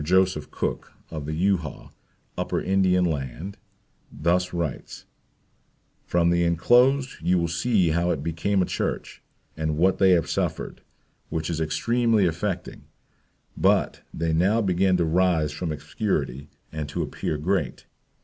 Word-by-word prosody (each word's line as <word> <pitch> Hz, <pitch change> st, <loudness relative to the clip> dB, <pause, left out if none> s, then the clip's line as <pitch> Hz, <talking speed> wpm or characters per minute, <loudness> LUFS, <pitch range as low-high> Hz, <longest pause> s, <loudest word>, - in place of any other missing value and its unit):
Joseph 95 Hz, -1 st, +2 dB
Cook, -, -, -4 dB, 0.2 s
of 75 Hz, -3 st, -5 dB
the 80 Hz, -, -2 dB
Euhaw, 85 Hz, -2 st, -1 dB, 0.4 s
upper -, -, -1 dB
Indian 95 Hz, -1 st, +2 dB
land, 80 Hz, -, -4 dB, 0.5 s
thus 90 Hz, +4 st, 0 dB
writes: 85 Hz, -5 st, -4 dB, 1.0 s
"From 85 Hz, 0 st, +2 dB
the 85 Hz, 0 st, +2 dB
enclosed 125 Hz, -, +3 dB
you 90 Hz, +3 st, +2 dB
will 85 Hz, -1 st, +1 dB
see 90 Hz, +2 st, +2 dB
how 85 Hz, +2 st, +1 dB
it 70 Hz, -5 st, -1 dB
became 90 Hz, +4 st, 0 dB
a -, -, 0 dB
church, -, -, -3 dB, 0.3 s
and 80 Hz, -1 st, -2 dB
what 90 Hz, +3 st, +3 dB
they 95 Hz, -, +5 dB
have 85 Hz, -3 st, +2 dB
suffered, -, -, -2 dB, 0.5 s
which 80 Hz, +1 st, -2 dB
is 80 Hz, -1 st, -2 dB
extremely 115 Hz, +6 st, +2 dB
affecting, 90 Hz, +2 st, -3 dB, 0.7 s
but -, -, +2 dB
they 80 Hz, 0 st, -1 dB
now 95 Hz, +8 st, +3 dB
begin 95 Hz, -2 st, +2 dB
to 85 Hz, -, +1 dB
rise 80 Hz, -2 st, +2 dB
from 80 Hz, +2 st, -4 dB
obscurity 75 Hz, -, -3 dB, 0.2 s
and 75 Hz, -2 st, -4 dB
to -, -, -2 dB
appear 75 Hz, -, -3 dB
great. 75 Hz, -4 st, -1 dB
85 Hz, 140 wpm, -25 LUFS, 80-95 Hz, 1.0 s, they